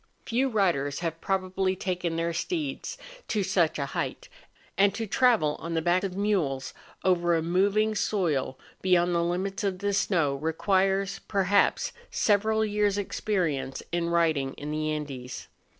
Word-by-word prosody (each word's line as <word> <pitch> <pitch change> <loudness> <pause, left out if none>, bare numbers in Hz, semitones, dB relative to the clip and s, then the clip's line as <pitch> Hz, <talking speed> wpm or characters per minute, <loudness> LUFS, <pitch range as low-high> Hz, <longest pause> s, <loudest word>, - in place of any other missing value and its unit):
Few 255 +4 +1
riders 170 - +1
have 165 -1 -3
probably 190 0 0
taken 180 -3 -2
their 165 +1 -1
steeds 300 - -3 0.3
to 210 -3 0
such 170 -4 +2
a 140 - -1
height; - - -4 0.5
and 200 0 +3
to 225 - -2
travel 215 - +3
on 165 0 -4
the 165 - +1
back 175 +2 +2
of 190 -1 -3
mules, 180 -11 0 0.3
over 175 -2 +3
a 165 - 0
moving 200 +5 +2
soil 160 -11 0 0.2
beyond 180 -1 +3
the 170 - +2
limits 190 +4 -2
of 195 -2 0
the 200 +2 -1
snow, 170 -7 +2
requires, 190 +5 +1
perhaps, 200 0 +2 0.2
several 220 +1 +2
years' 205 -1 +1
experience 170 -10 -2
in 170 0 0
riding 160 -6 +1
in 150 +1 -6
the 155 0 -1
Andes. 135 -5 -5
185 Hz, 150 wpm, -27 LUFS, 160-200 Hz, 0.5 s, and